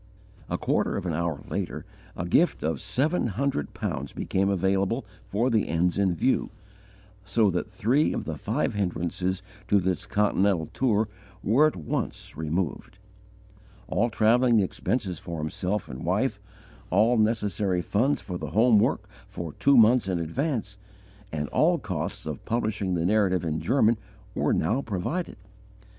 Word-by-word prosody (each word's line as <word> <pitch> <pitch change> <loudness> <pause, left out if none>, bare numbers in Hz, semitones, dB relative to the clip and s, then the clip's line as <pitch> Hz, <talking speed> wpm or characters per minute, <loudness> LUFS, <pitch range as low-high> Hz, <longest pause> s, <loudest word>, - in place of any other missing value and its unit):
A - - -1
quarter - - 0
of - - -4
an 85 - -1
hour 80 -2 -2
later, - - -4 0.3
a 90 - -2
gift 160 - +2
of 80 +1 -1
seven 130 - +1
hundred 120 - -2
pounds 70 +2 -4
became 95 +1 0
available 100 +5 +1 0.2
for 115 +6 0
the 110 -2 +2
ends 85 +3 +1
in 95 -3 +2
view, 130 - +1 0.7
so 100 +1 +2
that 90 +4 -2
three 120 +10 +2
of - - -3
the - - -3
five - - -1
hindrances 90 -1 -2 0.2
to 100 - +4
this 95 -1 -1
Continental 100 -4 +2
tour 110 - +1 0.4
were 135 +9 +5
at 155 - -3
once 80 -4 -4
removed. 80 +4 -3 0.9
All 115 +6 +1
travelling 115 +2 +4
expenses 95 -2 -1
for 85 -1 -6
himself 90 +6 -2
and 65 0 -7
wife, - - 0 0.5
all 110 +7 +4
necessary 105 -4 +1
funds 125 - +1
for 90 -2 -5
the - - -5
home 110 0 +5
work 110 -2 +1 0.2
for 85 -6 -6
two 140 -1 +4
months 115 -1 +6
in 95 -2 0
advance, 105 - -2 0.5
and 75 -1 -2
all - - +3
costs - - -4
of - - -5
publishing 105 -5 -1
the 85 -1 0
Narrative 95 -3 +2
in 80 -1 -1
German, 115 -2 +2 0.3
were - - +1
now 110 +12 +1
provided. 115 - -3
100 Hz, 150 wpm, -26 LUFS, 90-115 Hz, 0.9 s, months